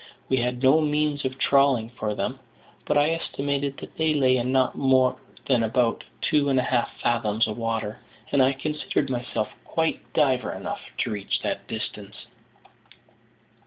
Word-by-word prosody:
We 130 - +3
had 125 +1 -1
no 140 +5 +6
means 150 -1 0
of 130 0 -2
trawling 135 -5 +3
for 110 -3 -3
them; 130 +5 -3 0.5
but - - +2
I 145 +2 +4
estimated 140 -3 -2
that - - -10
they 160 -1 +2
lay 130 -3 +4
in 125 +1 -1
not 130 -1 +2
more 130 -2 +3 0.3
than 125 -4 +3
about 115 +1 +1 0.2
two 145 -2 +2
and 135 - +2
a - - +1
half 120 -2 +1
fathoms 115 -2 +1
of 105 - -4
water, 115 -2 -3 0.3
and 140 - +4
I 130 +1 +4
considered 145 -1 -2
myself 120 -3 -2
quite 160 0 -1
diver 130 -5 +2
enough - - -5 0.2
to - - -1
reach 105 -2 -2
that - - -3
distance. 105 -2 -7
130 Hz, 160 wpm, -25 LUFS, 115-140 Hz, 0.5 s, no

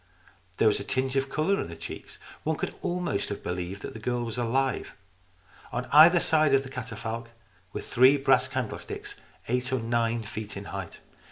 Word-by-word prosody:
There 110 - +4
was 105 - +3
a - - -4
tinge 130 +5 -1
of 135 0 +1
colour 170 +8 +1
in - - -4
the 85 - -7
cheeks. - - -8 0.2
One - - 0
could - - -3
almost 175 - -1
have 100 - -5
believed 90 +2 -4
that - - -6
the 110 - -8
girl 120 +2 -1
was 115 +1 -4
alive. 130 +3 0 0.8
On 125 +1 -2
either 165 +4 +9
side 155 -4 +4
of 135 - +3
the 130 - -8
catafalque 115 -2 -5 0.4
were - - -4
three 130 +3 +5
brass 135 -2 +4
candlesticks, 130 -4 -4 0.3
eight 125 +2 -1
or 130 - +2
nine 115 0 0
feet 110 -1 -6
in 100 - -7
height. 95 -3 -6
125 Hz, 185 wpm, -28 LUFS, 110-135 Hz, 0.8 s, either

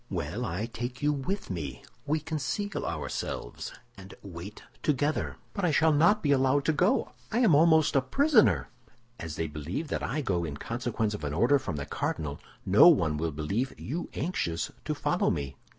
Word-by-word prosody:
Well, - - -3
I 90 +7 -2
take 120 +3 -6
you 150 0 +3
with 180 - -3
me; 70 -8 -5 0.2
we 155 +2 +1
conceal 160 +7 -3
ourselves, - - -4 0.2
and 95 0 -12
wait 95 +2 -9 0.2
together." 150 +1 0 0.2
"But 200 - -3
I 175 - +3
shall 160 +1 +4
not 170 +9 +4
be 145 - +2
allowed 135 +1 +3
to 160 - +3
go; 180 +7 +2 0.2
I 225 - 0
am 220 -10 +5
almost 160 0 +5
a 135 - +5
prisoner." 265 - +3 0.5
"As 80 -2 -5
they 80 - -1
believe 80 - -4
that - - -2
I 150 +6 -1
go 90 -10 0
in 75 -4 -4
consequence 115 - -2
of 105 - -6
an 75 0 -2
order 120 - +4
from 110 -11 -4
the 70 -1 -4
cardinal, 75 0 -3 0.3
no - - +7
one 80 -2 +4
will 80 +1 -1
believe 95 - -2
you 165 +8 -4
anxious 130 - -2
to - - -1
follow - - +1
me." 70 -1 -3
125 Hz, 180 wpm, -29 LUFS, -, 0.5 s, no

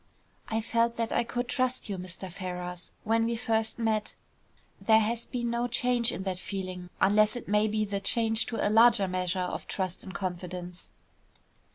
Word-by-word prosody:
"I 225 0 0
felt 230 +1 +1
that 230 -1 -2
I - - +2
could 245 +1 -3
trust 255 0 -1
you, 200 - -3
Mr. 185 +1 -5
Ferrars, 180 -1 -5
when 225 +1 +2
we 235 0 0
first 225 -2 0
met. 220 -2 0 0.7
There 220 -1 +6
has 230 +2 0
been 240 -1 -2
no 235 +1 0
change 245 -1 +2
in 185 - -4
that 185 -2 -2
feeling 185 -2 -5
unless 210 +3 +4
it 245 - -6
may 210 +1 +3
be 215 0 0
the 200 -1 -2
change 225 +2 +1
to 230 -3 0
a - - +1
larger 225 -2 +6
measure 180 0 -1
of 180 -1 -3
trust 185 -2 -3
and 190 - -8
confidence." 180 -1 -5
215 Hz, 180 wpm, -29 LUFS, 185-230 Hz, 0.7 s, There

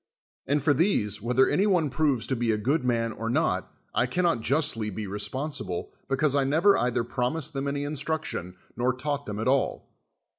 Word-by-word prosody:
And 140 0 +1
I'or 145 - +5
these, 120 - +1
whether 125 +4 +3
any 200 +3 +2
one 170 -8 +2
proves 140 -5 +1
to 130 - -1
be 120 -1 -1
a 110 - +2
good 130 +7 0
man 115 -2 +1
or 115 +1 -4
not, 120 - 0 0.2
I 125 - +2
cannot 170 -2 +1
jnstly 115 -5 +1
be 105 +2 -5
resptjnsible, 105 - -4 0.2
because 140 +1 +1
I 140 -1 +3
never 160 +9 +4
either 125 -1 +1
promised 130 +6 -2
them 135 0 -2
any 140 0 -1
instruction 145 - -3 0.2
nor 125 +2 +1
taught 145 +2 -3
them 105 -1 -4
at 110 - -1
all. 135 +1 0
130 Hz, 185 wpm, -27 LUFS, 115-150 Hz, 0.2 s, I'or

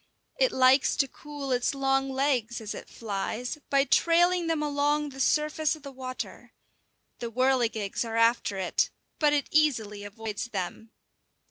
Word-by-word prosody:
It - - +4
likes 260 -2 +4
to 275 - +2
cool 290 0 -7
its 250 +2 +1
long 270 0 +1
legs, 260 -4 0
as 220 -2 -5
it - - -9
flies, 225 +5 -4
by 275 -1 +4
trailing 345 +3 +3
them 320 -2 0
along 295 0 +1
the 270 -1 -11
surface 305 +2 +1
of 310 - -16
the 280 - -8
water. 255 -1 -7 0.7
The 235 - -4
whirligigs 235 -5 +1
are 225 -1 -3
after 230 -3 +2
it, 185 -2 +1 0.3
but 300 -2 +4
it 290 -1 +1
easily 225 -10 +1
avoids 210 +1 -5
them. 200 +1 -5
265 Hz, 150 wpm, -28 LUFS, 230-295 Hz, 0.7 s, It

